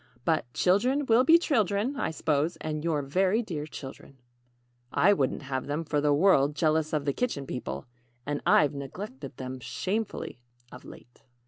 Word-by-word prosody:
But 155 -7 0
'Children 250 +10 +2
will 235 0 +5
be 320 +5 +7
children,' 225 - 0
I - - -1
'spose 155 +1 0
and 155 -1 -4
you're 155 -4 0
very 190 +10 +1
dear 155 -8 -5
children." 135 -2 -10 0.7
("I 205 +3 +4
wouldn't 140 -4 -1
have 130 -1 -3
them, 150 +3 -2
for 150 -1 0
the 150 0 +2
world, 145 -3 +4
jealous 155 0 +1
of 150 -2 -1
the 140 - +1
Kitchen 185 - -2
People 70 - -5 0.4
and 145 0 -2
I've 150 - +4
neglected 140 - -7
them 130 0 -6
shamefully 190 - -3 0.3
of 125 - -12
late.") 120 - -14
155 Hz, 160 wpm, -28 LUFS, 140-200 Hz, 0.7 s, be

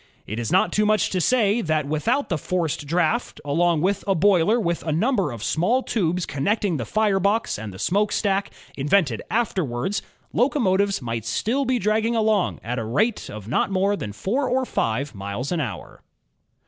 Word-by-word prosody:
It 110 +3 -5
is 115 -2 -3
not - - +3
too 210 0 +2
much 215 -1 +2
to 185 - 0
say 230 0 +2
that, 155 -4 0
without 220 - 0
the 170 - 0
forced 165 -3 -2
draft, 180 +9 0
along 165 +2 +2
with 195 +3 0
a 195 - +3
boiler 195 +4 +3
with 170 -6 -1
a 160 - -3
number 195 - +1
of 115 -3 -7
small 225 - +1
tubes 180 -4 0
connecting 195 +4 0
the 115 - -3
fire 210 - +2
box 200 - 0
and 110 -1 -6
the 95 - -10
smokestack, 200 - 0 0.3
invented 145 - +1
afterwards, 190 - -1 0.3
locomotives 200 - +1
might 115 -2 -3
still 265 - -1
be 255 0 +1
dragging 220 +2 +1
along 215 -4 +1
at 125 +2 -3
a - - -3
rate 205 - 0
of 105 -1 -8
not 125 - +1
more 195 +1 +1
than 105 - -5
four 240 - -1
or 260 +1 +1
five 130 - -1
miles 100 - -5
an 170 -3 0
hour. 100 -10 -6
185 Hz, 180 wpm, -23 LUFS, 140-215 Hz, 0.3 s, not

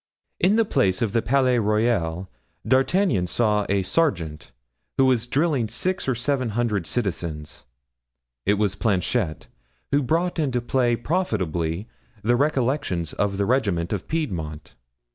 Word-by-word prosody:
In 190 +4 +4
the 225 0 +3
place 105 - +1
of 110 - 0
the 115 - +2
Palais 130 0 +2
Royal 105 -5 0 0.4
D'Artagnan 130 - +2
saw 105 0 +1
a 100 -1 +2
sergeant, 90 - -1 0.5
who 135 - +5
was 125 -3 +2
drilling 145 -4 +1
six 185 - -2
or 130 - +1
seven 130 0 0
hundred 105 -8 0
citizens. 80 - -4 0.8
It 100 - +3
was 105 -2 +1
Planchet, 95 - -1 0.5
who 140 +1 +3
brought 165 +6 0
into 130 -5 +1
play 120 0 +1
profitably 100 - -1 0.4
the 120 +3 +3
recollections 130 - 0
of 100 -1 -1
the 100 - +1
regiment 100 -8 0
of 100 - -4
Piedmont. 85 - -4
115 Hz, 135 wpm, -24 LUFS, 95-135 Hz, 0.8 s, who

